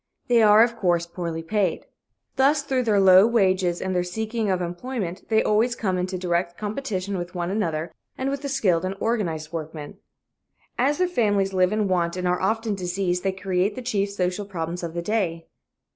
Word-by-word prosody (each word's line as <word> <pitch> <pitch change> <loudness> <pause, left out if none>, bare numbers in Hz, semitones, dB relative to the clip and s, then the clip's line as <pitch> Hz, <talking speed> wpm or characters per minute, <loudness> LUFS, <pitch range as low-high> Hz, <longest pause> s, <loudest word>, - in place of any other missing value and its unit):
They 240 -1 +5
are, 215 +1 +7
of 235 0 -1
course, 175 -4 +1
poorly 170 -2 -5
paid. 205 +3 -1 0.5
Thus, 280 +2 +3
through 265 -3 0
their 210 -3 +3
low 190 +1 +7
wages 185 -6 +2
and 190 0 -2
their 180 - +2
seeking 220 +4 -3
of 185 -1 +1
employment, 180 +1 -5
they 220 -1 +3
always 225 +3 +2
come 190 -5 -1
into 185 +1 -2
direct 175 -1 -1
competition 205 -4 -3
with 175 +1 -7
one 175 0 -2
another 165 -6 -2 0.2
and 265 +1 -1
with 280 0 -3
the 280 - -4
skilled 190 -11 +1
and 185 +1 -2
organized 170 -10 -2
workmen. 155 -2 -6 0.8
As 275 +4 +1
their 365 - +2
families 205 - +1
live 185 0 +3
in 215 -1 0
want 175 -1 0
and 180 0 -1
are 180 0 0
often 220 +2 0
diseased, 180 -1 -1
they 195 - 0
create 190 +1 -1
the 255 - -6
chief 205 -5 0
social 195 0 -2
problems 170 -2 -4
of 170 -1 -5
the 170 - -2
day. 175 -5 -1
190 Hz, 190 wpm, -24 LUFS, 175-220 Hz, 0.8 s, are